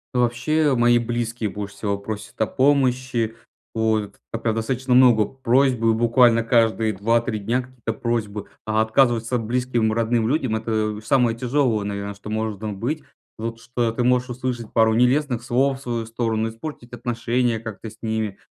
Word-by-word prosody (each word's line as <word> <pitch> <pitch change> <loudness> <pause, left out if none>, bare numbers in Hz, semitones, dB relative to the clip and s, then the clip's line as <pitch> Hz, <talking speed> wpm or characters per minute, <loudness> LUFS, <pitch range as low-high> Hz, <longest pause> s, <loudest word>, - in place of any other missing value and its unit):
Вообще, 135 +5 +2
мои 120 0 +5
близкие 120 -1 -2
больше 105 0 -6
всего 100 -2 -2
просят 110 +3 -7
о - - +2
помощи. 130 -4 +1 0.4
Вот, 110 -2 0 0.2
а 115 - -2
прям 115 -1 -1
достаточно 125 +3 -1
много 125 -4 +6
просьбы 125 -2 +2
буквально 115 0 +4
каждые 115 -1 +2
2-3 115 +3 0
дня 120 +5 -1
какие-то 125 -3 -6
просьбы. 110 -3 -3 0.2
А 110 0 +1
отказываться 120 +1 +2
близким 120 -1 0
родным 115 0 +1
людям 130 -6 0
это 110 -1 -1
самое 125 -3 +2
тяжелое, 125 -4 +1
наверно, 100 0 -4
что 100 +1 -11
может 110 -1 -3
там 105 -3 -5
быть. 150 +8 -2 0.3
Вот 115 +1 -5
что 120 0 -1
ты 120 +2 -1
можешь 125 0 +2
услышать 125 -2 -4
пару 110 -1 +4
нелестных 125 0 +2
слов 135 +2 +1
в - - -16
свою 120 -3 -3
сторону, 115 -1 -1
испортить 120 +1 -8
отношения 120 0 -1
как-то 110 0 -7
с 110 - -16
ними. 110 -3 -2
115 Hz, 160 wpm, -22 LUFS, 110-125 Hz, 0.4 s, много